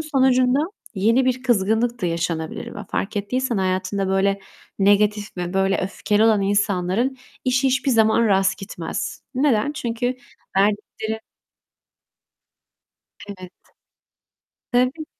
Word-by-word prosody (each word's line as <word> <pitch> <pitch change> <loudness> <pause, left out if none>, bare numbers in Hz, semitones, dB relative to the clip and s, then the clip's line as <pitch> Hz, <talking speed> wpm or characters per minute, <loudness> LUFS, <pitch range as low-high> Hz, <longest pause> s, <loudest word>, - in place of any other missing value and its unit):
sonucunda, 260 -4 +3 0.4
yeni 225 +6 +3
bir 255 0 0
kızgınlık 230 0 +1
da - - +2
yaşanabilir 165 -1 -3
ve - - -7
fark 210 - -2
ettiysen 250 +4 -1
hayatında 190 +1 -1
böyle 195 +1 +1 0.4
negatif 205 +1 +2
ve 175 0 -4
böyle 195 0 +2
öfkeli 205 +3 0
olan 220 -3 +4
insanların 200 +4 +1 0.3
işi 255 +1 +2
hiçbir 265 +1 +1
zaman 225 -1 +4
rast 195 -2 +2
gitmez. 190 -5 -5
Neden? 265 -1 +2
Çünkü 245 -3 -2 0.4
verdikleri 210 +2 0 2.1
Evet. 185 -3 -9 1.2
Tabii! 255 +6 +1
210 Hz, 105 wpm, -22 LUFS, 195-250 Hz, 2.1 s, olan